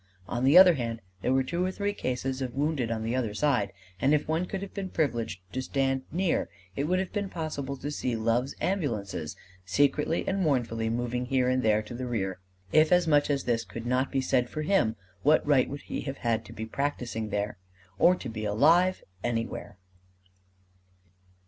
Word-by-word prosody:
On 120 +3 -2
the 140 +6 +6
other 185 -1 +10
hand, 115 -5 -3 0.2
there 125 - +1
were 130 0 +3
two 170 +7 -1
or 185 - +1
three 200 +2 -2
cases 130 -4 -2
of 125 -2 -3
wounded 140 -4 0
on 110 -1 -2
the 115 +2 -1
other 115 -5 -1
side; 125 -7 +1 0.3
and 140 +3 +4
if 150 - -1
one 160 +3 0
could 195 +1 -4
have 200 - -8
been 195 -2 -4
privileged 120 - -1
to 130 - -1
stand 135 0 0
near, 180 +2 0 0.3
it 140 - -1
would 180 +4 +1
have 190 -1 -2
been 205 -2 -2
possible 145 -6 -4
to 145 +3 -4
see 125 -4 -2
Love's 115 +4 0
ambulances 110 - -2 0.3
secretly 145 - +1
and 195 0 0
mournfully 115 -8 0
moving 120 +1 -2
here 130 -1 +2
and 130 0 +2
there 110 -2 +3
to 105 - -9
the 125 +1 -4
rear. 95 -6 -2 0.3
If 155 0 +5
as 180 -1 +4
much 145 -2 +4
as 140 -1 +1
this 115 -2 0
could 115 0 -8
not 125 +2 +1
be 135 - +1
said 125 -2 +1
for 155 - -4
him, 150 - +2 0.3
what 150 +3 +4
right 140 -3 +3
would 140 +1 -6
he - - -4
have 135 -1 -5
had 115 -1 -1
to - - -11
be 110 - -5
practising 115 -3 -3
there 105 -2 -2 0.4
or 180 - +6
to 135 - -7
be 110 -2 -5
alive 165 - +4 0.2
anywhere! 115 -4 -3
130 Hz, 200 wpm, -28 LUFS, 115-155 Hz, 0.4 s, other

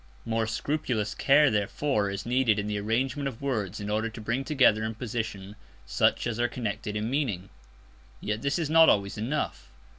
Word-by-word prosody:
More 115 -1 0
scrupulous 115 -3 -2
care 145 +1 +4
therefore 105 +1 0
is 100 0 -5
needed 120 -3 +2
in 105 - -1
the 105 -1 -2
arrangement 130 +7 -1
of 125 -5 -6
words 110 -7 -2
in 100 - -5
order 110 +2 0
to 115 - -10
bring 115 +5 -2
together 130 -7 +3
in 110 0 -3
position 110 -4 -5 0.3
such - - +1
as 120 -1 -2
are 120 - +3
connected 105 -3 -4
in 105 +1 -1
meaning. 120 -9 -2 0.7
Yet 105 +1 -3
this 140 +1 0
is 165 -3 -1
not 160 +1 +6
always 100 0 +1
enough. 135 +8 -3
115 Hz, 180 wpm, -27 LUFS, 105-135 Hz, 0.7 s, not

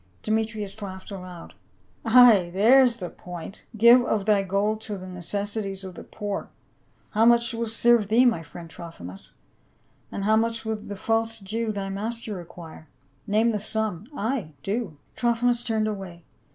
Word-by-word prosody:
Demetrius 215 -1 -2
laughed 190 0 -8
aloud. 180 -3 -9 0.3
" - - -34
Ay! 225 -6 +7
there's 240 +5 +5
the 180 -5 -6
point! 180 +2 -9
' 225 - -13
Give 235 +3 +7
of 215 -4 -1
thy 210 -2 +4
gold 200 +3 -1
to 210 -2 -4
the 185 - -9
necessities 195 +2 -4
of 190 -1 -8
the - - -10
poor.' 205 -2 -5 0.6
How 220 +1 +2
much 235 +1 +4
will 230 0 -2
serve 225 -1 +3
thee, 230 +5 +4
my 230 -10 +2
friend 165 +2 -11
Trophi 165 - -11
mus? 90 +2 -9 0.8
and 200 - -4
how 215 +2 +3
much 230 0 0
will 220 0 -1
the 205 -1 -8
false 225 +2 0
Jew, 220 +3 -2
thy 200 -2 -4
master, 220 +3 -3
require? 170 -3 -10 0.4
Name 220 +3 +3
the 210 - -1
sum. 215 -2 -2
— - - -12
Ay, 220 - -2
do 200 -6 -3
!" - - -38
Trophimus 240 0 +1
turned 220 -2 0
away. 190 -5 -6
210 Hz, 175 wpm, -25 LUFS, 190-225 Hz, 0.8 s, Ay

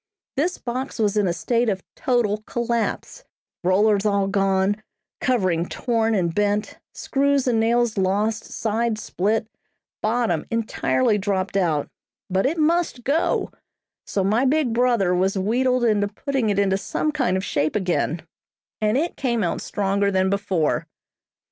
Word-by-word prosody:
This 340 +7 0
box 255 +2 -4
was 215 -3 +1
in 205 -2 +2
a - - +1
state 230 +7 0
of 190 -3 -2
total 225 -5 0
collapse; 235 - -2 0.4
rollers 200 +3 +3
all 200 -2 +2
gone, 195 +1 +1 0.4
covering 185 -9 +1
torn 225 -2 0
and 170 -4 0
bent, 205 +1 0
screws 280 -1 0
and 235 -3 +2
nails 230 -1 +2
lost, 210 +4 0
sides 220 0 -2
split, 215 +4 0 0.5
bottom 220 -6 0
entirely 230 0 +1
dropped 195 -1 -1
out, 165 -7 +1 0.4
but 190 +5 +2
it 320 +5 -1
must 320 -5 +1
go; 295 +6 0 0.6
so 195 - 0
my 215 +6 +2
big 270 -2 +2
brother 235 -6 +2
was 190 +2 +1
wheedled 250 +6 +1
into 210 -3 +2
putting 235 +3 -2
it 200 - 0
into 195 -1 +2
some 305 - -1
kind 255 -11 0
of 190 - -3
shape 155 +6 0
again, 175 -4 0 0.6
and 215 +3 +2
it 330 +5 -1
came 235 -5 0
out 170 - -1
stronger 200 0 0
than 190 0 +1
before. 195 -6 0
215 Hz, 145 wpm, -23 LUFS, 195-240 Hz, 0.6 s, rollers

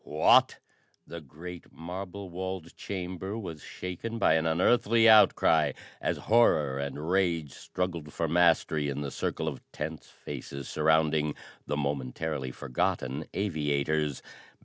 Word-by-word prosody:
"What?" 75 +1 +4 0.5
The 85 0 -8
great 85 +5 -10
marble 95 +3 -7
walled 95 -1 -5
chamber 95 +2 -5
was 85 -9 -7
shaken 90 +6 -6
by 95 - +4
an 80 0 +2
unearthly 115 +7 +4
outcry 80 -9 +5 0.3
as - - 0
horror 75 - +3
and 70 +2 -4
rage 85 -6 +1
struggled 85 -3 -4
for 85 - -2
mastery 80 -3 +3
in 70 +1 -3
the 70 -1 -4
circle - - -3
of - - -4
tense 80 +1 -6
faces 70 -1 -8
surrounding 75 -1 +2 0.3
the 75 - -1
momentarily 70 0 -2
forgotten 65 +2 -2
aviators. 75 -5 -1
80 Hz, 125 wpm, -29 LUFS, 75-90 Hz, 0.5 s, outcry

